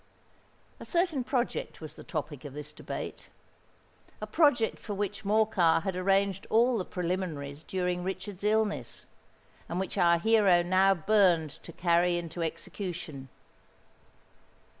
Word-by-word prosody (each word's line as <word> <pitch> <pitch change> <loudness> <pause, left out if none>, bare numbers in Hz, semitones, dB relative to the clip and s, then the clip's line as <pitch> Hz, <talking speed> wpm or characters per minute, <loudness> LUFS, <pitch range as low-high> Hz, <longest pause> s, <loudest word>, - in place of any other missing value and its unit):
A - - -8
certain 340 -7 0
project 255 -1 -2
was 155 -2 -8
the - - -12
topic 150 -3 -5
of 145 -2 -8
this 150 0 -8
debate,—a - - -10
project 290 -9 +2
for 205 - -5
which 205 +1 -3
Morcar 205 -6 +3
had 190 -2 -2
arranged 195 +1 +1
all 235 +1 +3
the 185 - -3
preliminaries 170 -6 -3
during 180 0 -2
Richard's 190 +1 -5
illness, 215 0 0 0.6
and 175 - -2
which 190 - -3
our 170 -1 +5
hero 200 -3 +4
now 190 +2 +4
burned 175 -4 +3
to - - -10
carry 175 +1 +2
into 170 0 -5
execution. 165 -4 -5
185 Hz, 125 wpm, -29 LUFS, 170-210 Hz, 0.6 s, our